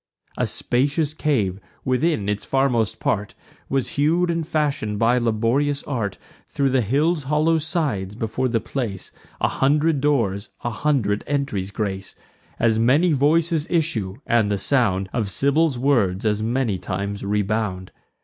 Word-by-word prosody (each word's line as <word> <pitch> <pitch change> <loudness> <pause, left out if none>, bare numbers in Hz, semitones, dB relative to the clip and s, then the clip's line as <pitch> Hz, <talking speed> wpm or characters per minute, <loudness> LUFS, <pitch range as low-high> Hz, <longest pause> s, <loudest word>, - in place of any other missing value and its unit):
A - - 0
spacious 145 +4 0
cave, 110 - 0 0.3
within 130 -3 +1
its 105 0 -1
farmost 125 -6 +1
part, 105 -1 -1 0.3
Was 135 -2 0
hew'd 170 +5 +2
and 165 -2 -2
fashion'd 145 -9 -1
by 120 +3 +3
laborious 120 +5 +1
art 115 -9 -3 0.3
Thro' 140 -1 +1
the 130 -1 +2
hill's 145 - +1
hollow 155 +3 +2
sides: 145 - -2
before 115 +3 -1
the 115 -2 +1
place, 110 -7 -4 0.3
A - - +3
hundred 150 +2 +2
doors 115 -9 0
a 120 - -1
hundred 115 -6 0
entries 140 -10 -1
grace; 100 -2 -4 0.4
As 110 -1 +2
many 145 +9 +4
voices 155 +3 +2
issue, 145 - 0
and 115 -3 +2
the 100 - +1
sound 100 -6 +1
Of 110 -5 -1
Sybil's 140 - +2
words 115 -8 +1
as 105 0 +1
many 115 -3 0
times 100 +3 -4
rebound. 100 -2 -1
125 Hz, 140 wpm, -22 LUFS, 105-145 Hz, 0.4 s, many